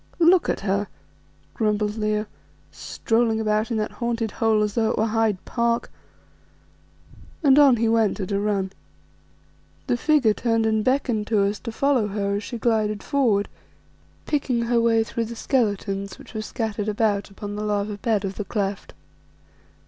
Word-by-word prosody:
"Look 345 +1 +4
at - - -1
her," 200 +1 0 0.7
grumbled 210 -1 0
Leo, 215 -1 -1 0.5
"strolling 225 -1 0
about 215 +1 0
in 230 - -1
that 215 0 -2
haunted 230 -2 -2
hole 220 -1 +2
as 210 -1 -1
though 220 0 +1
it - - -1
were 220 - +2
Hyde 220 -2 +1
Park;" 235 -1 -1 1.5
and 280 -1 +6
on 280 -4 +7
he 230 0 +1
went 225 -2 +2
at 190 0 -4
a 200 - +1
run. 200 -2 -1 1.1
The 120 - +1
figure 280 - +3
turned 225 0 0
and 220 -1 +1
beckoned 245 -5 0
to 210 -3 +2
us 200 +1 -1
to 230 - -6
follow 260 -2 +1
her 200 0 -1
as 205 - -5
she 240 - -5
glided 215 -3 0
forward, 230 -8 +1 0.8
picking 260 -5 0
her 235 0 +2
way 225 -1 +3
through 230 +1 -3
the 235 +1 -7
skeletons 200 -6 -1
which - - -14
were 220 - -3
scattered 215 -1 -3
about 205 -1 0
upon 205 +1 -7
the 210 - -4
lava 205 0 -1
bed 215 -3 0
of 190 0 -5
the 210 - -3
cleft. 200 -1 -3
220 Hz, 165 wpm, -23 LUFS, 205-235 Hz, 1.5 s, on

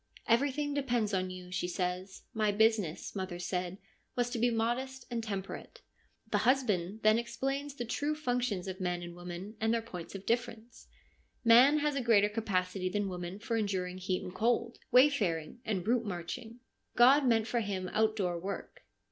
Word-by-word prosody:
' - - -32
Everything 285 +4 +2
depends 245 -7 0
on 185 -1 0
you,' 180 -1 -9
she 180 - -1
says; 180 +1 -3
' - - -46
my 215 -3 +2
business, 215 -6 +1
mother 185 -2 -3
said, 180 +1 -3 0.4
was 245 0 0
to 240 - -2
be 240 +2 +4
modest 240 +3 -1
and 230 -1 -2
temperate/ 195 -3 -6 0.5
The - - +3
husband 220 -6 +1
then 215 +1 +5
ex 235 - -7
plains 275 +1 -2
the 240 - -4
true 290 +6 -1
functions 245 -9 -1
of 190 0 -5
man 175 -1 -1
and 175 0 -7
woman 175 +4 -7
and 225 0 +2
their 230 0 +1
points 180 -5 -8
of 195 - -7
difference. 235 -1 -3 0.6
Man 250 +6 +7
has 295 -1 +1
a 275 - 0
greater 210 -4 +4
capacity 185 -4 -1
than 205 +1 -1
woman 180 +1 -5
for 230 +2 -2
enduring 185 -4 -2
heat 185 0 -1
and 180 - -7
cold, 235 +2 0
wayfaring 235 - +3
and 190 -4 -2
route 235 0 +2
marching. 210 +6 -6 0.3
God 265 +3 +6
meant 225 -2 +3
for 240 +1 0
him 195 -4 -2
outdoor 210 -5 +1
work. 195 +3 -6
220 Hz, 180 wpm, -32 LUFS, 185-240 Hz, 0.6 s, Man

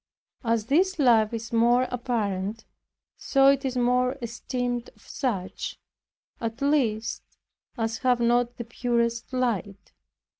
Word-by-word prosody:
As 230 -2 +1
this 365 +9 +2
life 230 -7 +4
is 230 0 -6
more 240 +2 +4
apparent, 220 -3 -2 0.5
so 270 -1 +2
it 275 0 +2
is 260 -2 -2
more 250 +2 +2
esteemed 245 0 -3
of - - -23
such, 205 -9 -3 0.6
at 230 +1 -4
least, 260 -7 +1 0.6
as 225 0 -2
have 250 -2 +2
not 240 0 +2
the 235 - -5
purest 235 0 -1
light. 215 -6 -2
240 Hz, 120 wpm, -26 LUFS, 225-250 Hz, 0.6 s, life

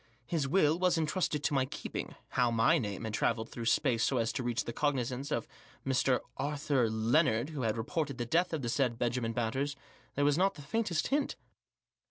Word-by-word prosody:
His 150 -1 -1
will 155 0 +3
was 180 -2 +3
entrusted 155 -1 0
to 150 - +1
my 135 -2 +2
keeping - - -6
— - - -38
how 125 -1 +4
my 115 -1 +4
name 105 -2 -4
had 110 -1 -4
travelled 110 0 0
through 115 - -6
space 115 -1 +2
so 135 - +2
as 115 -1 0
to 135 - -2
reach 120 0 -1
the 120 - -4
cognisance 135 -1 -1
of - - -1 0.4
the 135 - -1
Mr. 130 -1 +2 0.2
Arthur 140 -3 +1
iinnard 115 +3 +2
who 150 -4 -5
had 115 -1 0
reported 140 +3 -2
the 120 - -2
death 170 +9 +2
of 155 -4 -2
the 120 - -1
said 125 -2 +1
Benjamin 120 -1 -1
Batters 130 +5 -1 0.4
there 145 - +2
was 145 +3 +3
not 195 +1 +3
the 145 - -10
faintest 175 0 -1
hint. 285 0 0
135 Hz, 210 wpm, -32 LUFS, 120-150 Hz, 0.4 s, how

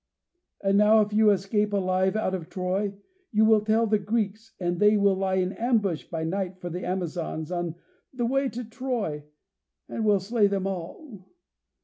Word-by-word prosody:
And 195 0 +3
now 215 +1 +6
if 210 0 -1
you 215 0 +5
escape 205 +1 +1
alive 185 0 +1
out 215 -3 0
of 175 -4 -4
Troy, 195 +2 -2 0.4
you 220 -1 +4
will 220 -1 +5
tell 220 +2 +2
the 215 -1 +2
Greeks, 220 +1 -3
and 175 -1 -1
they 210 0 +5
will 200 -1 +4
lie 190 0 0
in 185 0 +1
ambush 215 -9 0
by 165 -2 -4
night 185 +2 -2
for 175 -1 -6
the 180 +2 -5
Amazons 175 -3 -3
on 175 -2 -2 0.4
the 245 -3 -2
way 270 +2 +1
to 245 +1 -6
Troy 225 - -3 0.6
and 225 - -4
will 205 -2 +4
slay 205 +2 +2
them 195 -1 -1
all. 195 - -7
200 Hz, 175 wpm, -26 LUFS, 185-220 Hz, 0.6 s, now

